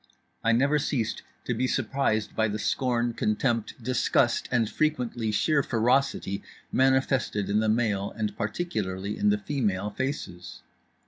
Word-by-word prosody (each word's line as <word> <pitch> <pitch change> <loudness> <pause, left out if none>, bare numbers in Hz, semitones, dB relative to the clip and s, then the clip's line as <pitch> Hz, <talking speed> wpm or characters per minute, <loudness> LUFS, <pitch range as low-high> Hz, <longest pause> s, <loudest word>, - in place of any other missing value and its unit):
I 115 - +3
never 140 +6 +3
ceased 120 -6 -1 0.2
to - - 0
be 130 - 0
surprised 125 -4 0
by 110 - +2
the 105 0 -2
scorn, 120 +1 0
contempt, 115 +1 0
disgust 125 0 +2
and 120 -3 +2
frequently 120 -5 -1
sheer 145 +7 +2
ferocity 120 -4 +1 0.3
manifested 130 -6 +2
in 105 - +3
the 110 0 +1
male 105 -3 +1
and 105 -2 -2
particularly 105 - -3
in 210 - +2
the 205 - +3
female 105 - -1
faces. 90 - -5
115 Hz, 135 wpm, -27 LUFS, 105-135 Hz, 0.3 s, I